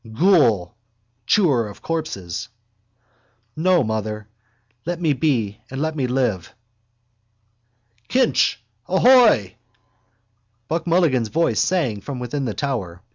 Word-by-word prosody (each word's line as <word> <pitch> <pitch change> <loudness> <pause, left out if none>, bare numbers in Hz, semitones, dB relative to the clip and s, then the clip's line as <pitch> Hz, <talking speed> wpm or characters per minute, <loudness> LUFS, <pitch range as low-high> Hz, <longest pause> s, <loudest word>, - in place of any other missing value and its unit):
_ 110 - -12
Ghoul! 125 - +3 0.5
Chewer 140 - +3
of 100 - -12
corpses! 155 - -4 1.1
No, 175 0 +2
mother! 110 -1 -4 0.6
Let 175 +2 -4
me 160 -4 +1
be 120 -8 -1
and 135 - -6
let 160 +1 -2
me 135 -4 -1
live. 120 -9 -2 1.5
—Kinch 255 -2 +2 0.3
ahoy! 200 - +4 1.1
Buck 165 +4 -3
Mulligan's 160 -9 +2
voice 165 +6 +1
sang 135 - 0
from 140 +5 -6
within 125 +3 -4
the 110 - -3
tower. 100 -11 -4
135 Hz, 110 wpm, -21 LUFS, 110-165 Hz, 1.5 s, ahoy